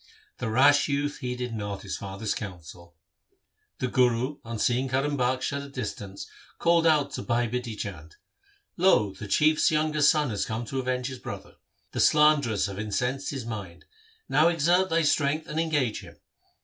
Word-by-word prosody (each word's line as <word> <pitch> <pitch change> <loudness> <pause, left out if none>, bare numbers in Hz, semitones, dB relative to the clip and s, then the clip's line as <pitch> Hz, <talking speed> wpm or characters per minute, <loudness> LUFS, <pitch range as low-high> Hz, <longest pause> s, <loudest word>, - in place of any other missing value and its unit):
The - - -2
rash 140 +5 +5
youth 145 +1 -1
heeded 125 -2 -4
not 100 -2 -5
his 95 - -4
father's 100 +2 -4
counsel. 85 -3 -9 0.8
The 130 - -1
Guru 125 +3 +1
on 115 0 -5
seeing 125 +4 +1
Karim 135 +3 0
Bakhsh 130 +1 0
at 140 - -3
a 140 - -9
distance 105 -6 -6 0.3
called 170 -1 +3
out 150 -3 +3
to - - -4
Bhai 120 0 0
Bidhi 120 -1 -4
Chand, 80 -7 -7 0.3
' 405 0 -38
Lo! 105 - +4
the 105 +2 -8
Chief's 155 +9 +3
young 155 0 +1
son 150 -2 +4
hath 100 - -2
come 110 +2 -3
to 135 +3 -3
avenge 125 -1 -2
his 130 -1 -5
brother. - - -8 0.3
The - - -4
slanderers 150 -8 +4
have 100 -1 -5
incensed 125 +6 -2
his 135 -5 -5
mind. 100 -7 -7 0.4
Now 155 +2 +4
exert 175 +3 +2
thy 165 0 +2
strength 155 +1 +1
and 155 - -3
engage 145 -8 0
him. - - -13
125 Hz, 175 wpm, -27 LUFS, 110-145 Hz, 0.8 s, rash